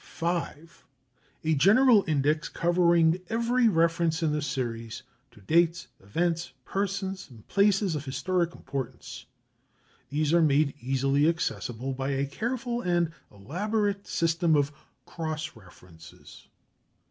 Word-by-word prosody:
5. 170 -2 -4 0.6
A 160 0 +2
general 210 - +5
index 150 0 +1
covering 170 0 +3
every 235 +2 +2
reference 165 -2 +1
in 155 - +2
the 150 0 -1
series 115 -5 -4 0.3
to - - -19
dates, 170 - +1
events, 165 - -2
persons, 195 -2 -3
and 115 -4 -16
places 200 -2 +2
of 150 -1 -4
historic 170 +5 -1
importance. 135 -3 -7 0.8
These 150 +2 0
are 170 - +5
made 150 -2 +3
easily 135 +4 +2
accessible 135 -6 -3
by 135 +1 -3
a 135 +1 0
careful 240 - -3
and 175 -3 +1 0.2
elaborate 200 - -2
system 165 0 +1
of 145 0 +2 0.3
cross 155 -1 -5
references. 85 -5 -16
165 Hz, 115 wpm, -27 LUFS, 140-180 Hz, 0.8 s, general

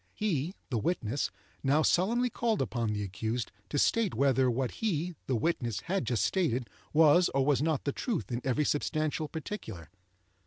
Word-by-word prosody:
He 180 -4 -1 0.2
(the 120 - +1
witness) 135 - -1 0.3
now 145 +3 +3
solemnly 235 +10 +2
called 225 -2 0
upon 120 -4 -1
the 105 -1 -2
accused 110 +5 -3 0.2
to 145 - -2
state 215 - +2
whether 130 0 +3
what 125 +1 0
he 180 -5 0
(the 130 - +1
witness) 120 - -1
had 190 +2 -1
just 120 -3 +1
stated 130 -10 0 0.2
was 160 +3 +6
or 135 -1 +3
was 145 -2 +3
not 155 -2 0
the 140 - 0
truth 215 - -3
in 120 +1 -2
every 135 +3 +1
substantial 155 +1 0
particular. 115 - -7
145 Hz, 165 wpm, -30 LUFS, 120-175 Hz, 0.3 s, was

